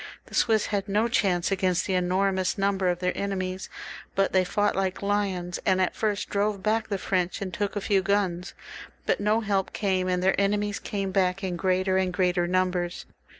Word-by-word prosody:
The - - -17
Swiss 220 -2 +3
had 200 -1 -2
no 210 +3 +2
chance 190 -6 +1
against 185 -2 +1
the 190 - -1
enormous 185 +1 +1
number 195 -2 +1
of 175 - 0
their 180 0 -1
enemies, 190 -2 -3 0.5
but 195 0 +1
they 185 -1 +4
fought 205 +3 0
like 190 0 -1
lions, 195 -4 -1
and 190 -1 +2
at 185 - +1
first 210 -2 -1
drove 205 -1 0
back 220 +1 +1
the 200 - -1
French 185 -1 -1
and 190 -3 -5
took 205 +2 -2
a 205 - -1
few 195 -1 +2
guns. 185 -2 -1 0.5
But - - +1
no 210 +2 +2
help 200 -3 -1
came, 190 -3 0
and 180 0 0
their 190 +1 +3
enemies 205 +1 0
came 195 -2 -3
back 190 0 +1
in 185 -2 -2
greater 185 +1 +1
and 185 -1 0
greater 180 -1 +1
numbers. 180 -1 0
190 Hz, 195 wpm, -26 LUFS, 185-200 Hz, 0.5 s, they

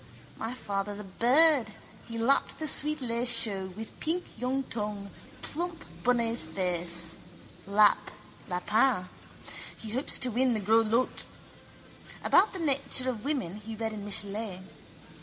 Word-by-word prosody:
My 225 +3 -5
father's 200 -3 -4
a 210 - -6
bird, 245 - +3 0.3
he 230 0 -7
lapped 245 +5 +1
the 315 - -4
sweet 300 +1 +4
lait 235 0 -1
chaud 195 -6 +1
with 225 0 -9
pink 345 +3 -2
young 255 +3 -2
tongue, 210 -4 -5 0.3
plump 340 +2 -4 0.2
bunny's 235 -6 +1
face. 170 -1 -1 0.5
Lap, 205 +1 +3 0.4
lapin. 190 +2 +1 0.7
He 220 - -6
hopes 260 +5 +2
to 255 - +4
win 255 +4 +1
in - - +2
the - - -1
gros 220 +2 +3
lots. 235 +4 0 1.0
About 390 +4 +4
the - - -7
nature 275 -5 +3
of 220 -4 -9
women 255 - -2
he 220 +1 -8
read 220 0 -3
in 210 -1 -7
Michelet. 205 -1 0
225 Hz, 140 wpm, -28 LUFS, 200-255 Hz, 1.0 s, sweet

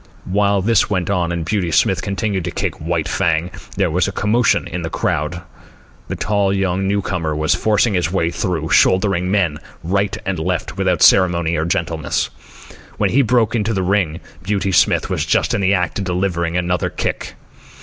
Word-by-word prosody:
While 100 0 +1
this 115 0 +2
went 95 -2 -1
on, 90 -3 0
and 85 -2 -3
Beauty 95 -1 -1
Smith 80 - +2
continued 100 -1 -2
to - - -2
kick - - -3
White 80 0 -1
Fang, 85 -1 0 0.3
there - - +1
was - - +1
a - - -2
commotion 115 +1 +1
in 85 +1 -5
the 80 - -4
crowd. 80 +3 -2 0.6
The - - -4
tall 100 -2 0
young 95 -1 0
newcomer 90 -6 -1
was 75 0 +1
forcing 105 +5 +1
his 90 -3 0
way 85 -3 0
through, 85 -3 -2
shouldering 95 -2 +3
men 90 -7 +1 0.2
right 100 +3 0
and 95 -3 -2
left 90 +1 -2
without 95 -3 +1
ceremony 85 -3 +4
or 80 - -1
gentleness. 85 -3 -1 0.7
When - - +1
he 140 - +4
broke 120 -3 +2
through 120 - 0
into 110 +2 -1
the 95 - 0
ring, 90 -3 0 0.2
Beauty 100 0 -1
Smith 90 - +3
was - - -1
just - - +1
in - - 0
the 100 +1 +3
act 90 -1 -1
of 100 - -3
delivering 90 -2 -1
another 90 0 0
kick. - - -4
90 Hz, 185 wpm, -18 LUFS, 85-100 Hz, 0.7 s, ceremony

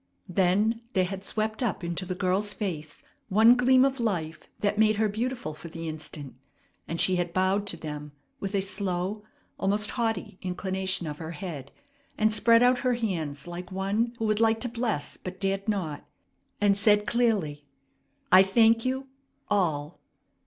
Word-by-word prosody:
Then 195 +6 +2
there 185 -1 +3
had 190 +1 -6
swept 215 +2 -2
up 215 -7 -1
into 175 +2 -3
the 185 - -3
girl's 195 +3 0
face 155 -8 -5 0.3
one 225 +5 +6
gleam 255 +1 +5
of 270 -1 -1
life 170 -8 -2
that 210 0 0
made 215 0 +4
her 215 +1 +2
beautiful 230 -4 -3
for 155 +3 -10
the 165 0 -7
instant, 155 -3 -6 0.5
and 165 - -4
she 185 -1 +3
had 175 -1 -2
bowed 190 +2 +1
to - - +3
them 150 -1 -7 0.3
with 195 +1 -3
a 195 - +2
slow, 190 +1 -2 0.4
almost 205 +2 +1
haughty, 225 -6 -2
inclination 190 0 -1
of 150 -1 -6
her 165 0 -6
head, 155 -8 -7 0.5
and 215 0 +3
spread 230 +2 +5
out 250 0 +4
her 250 -1 +1
hands 160 -11 -3
like 175 +2 -7
one 205 +5 -1
who 225 - -2
would 215 -1 +1
like 225 0 +3
to 245 - -2
bless 225 - -2
but 185 0 -8
dared 195 +1 -1
not, 170 -8 -2 0.6
and 205 -1 +4
said 210 0 +4
clearly, 200 -12 0 0.6
"I 185 +1 +9
thank 225 +4 +4
you 265 +1 -2 0.4
all!" 160 -6 0
195 Hz, 165 wpm, -27 LUFS, 175-220 Hz, 0.6 s, I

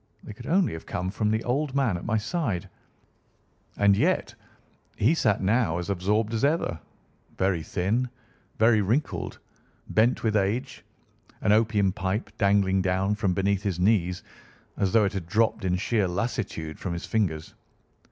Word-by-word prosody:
They - - -8
could 120 +5 -11
only 180 - +2
have 80 - -8
come 90 +1 -3
from 105 +1 0
the 110 +1 0
old 140 +2 -1
man 130 -9 +2
at 85 - -5
my 110 - 0
side, 110 - -2 1.1
and 100 -1 +5
yet - - +1 0.6
he 115 +10 +3
sat 105 -11 +1
now 105 -4 +2
as 90 +3 -3
absorbed 105 +4 0
as 115 - -1
ever, 140 - +1 0.6
very 95 -3 +1
thin, 105 +10 -1 0.5
very 110 -1 +4
wrinkled, 120 +10 -1 0.5
bent 115 +4 +2
with 110 -2 +1
age, 105 +5 -1 0.6
an - - +2
opium 105 -3 +3
pipe 95 +3 -3
dangling 100 -1 +3
down 95 +2 +1
from 100 -4 0
between 100 +1 +1
his 95 -4 -3
knees, 90 -2 +1 0.5
as 95 -2 0
though 110 0 +4
it 100 - -1
had 95 -4 -4
dropped 110 +4 +1
in 90 -1 +1
sheer 100 +1 +1
lassitude 90 -5 -3
from 90 - -3
his 85 - -5
fingers. 80 -8 -1
100 Hz, 160 wpm, -26 LUFS, 95-115 Hz, 1.1 s, and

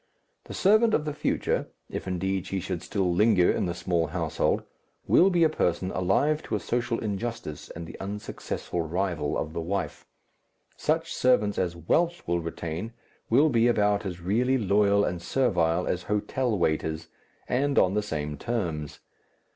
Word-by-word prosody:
The - - -8
servant 215 +3 +4
of 150 - -1
the 150 - -2
future, - - -1 0.2
if - - -6
indeed 95 0 -1
she 95 - -2
should 90 -1 -4
still 95 -4 0
linger 100 -1 +4
in - - 0
the 85 - -3
small 85 -3 0
household, 80 -1 0 0.4
will 185 - +5
be 175 -3 +3
a - - +7
person 95 - 0
alive 140 - +1
to 110 - -3
a - - 0
social 120 +1 -1
injustice 105 -7 -4
and 85 0 -7
the 80 - -10
unsuccessful 100 -3 -4
rival 85 -2 -1
of 75 - -3
the 85 - -3
wife. 90 -2 -3 0.7
Such 160 +2 0
servants 105 -5 +2
as 85 -2 -1
wealth 170 - 0
will 85 0 +1
retain 85 +5 -5 0.4
will 140 +7 +5
be 120 -3 +3
about 105 -3 +2
as 90 -3 -5
really 120 +9 +2
loyal 100 -2 +3
and 85 -1 -3
servile 90 -7 +1
as 90 - -1
hotel 110 +3 -1
waiters, 80 -1 -1 0.4
and 140 +3 0
on 95 - +4
the 105 - +1
same 75 -7 -4
terms. 85 - -3
100 Hz, 165 wpm, -27 LUFS, 85-120 Hz, 0.7 s, a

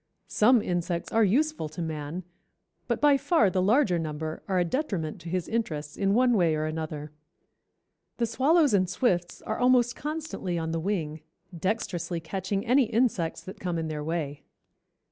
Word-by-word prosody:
Some 235 +1 +4
insects 175 -1 -2
are 225 - +4
useful 270 - +1
to 155 - -10
man, 160 +1 -4 0.6
but - - 0
by 290 -1 +5
far 270 - +3
the 185 - +1
larger 205 -3 +3
number 155 0 -4
are 190 -2 0
a 175 - +3
detriment 185 - -2
to 170 - -7
his 180 0 -2
interests 155 -10 -3
in 195 0 +1
one 250 0 +4
way 170 -5 +3
or 155 0 -1
another. 155 -1 -4 1.1
The 235 - +1
swallows 275 +4 +3
and 185 -3 +3
swifts 180 -4 0
are 220 - -3
almost 245 -1 +4
constantly 300 - -4
on 160 -1 -2
the 165 - -1
wing, 160 -4 -2 0.3
dexterously 175 -2 -2
catching 195 +5 -3
any 255 +2 +4
insects 220 -8 0
that 190 - -9
come 175 -2 -2
in 160 -1 -2
their 150 -1 -4
way. 150 -3 -3
185 Hz, 165 wpm, -27 LUFS, 160-235 Hz, 1.1 s, by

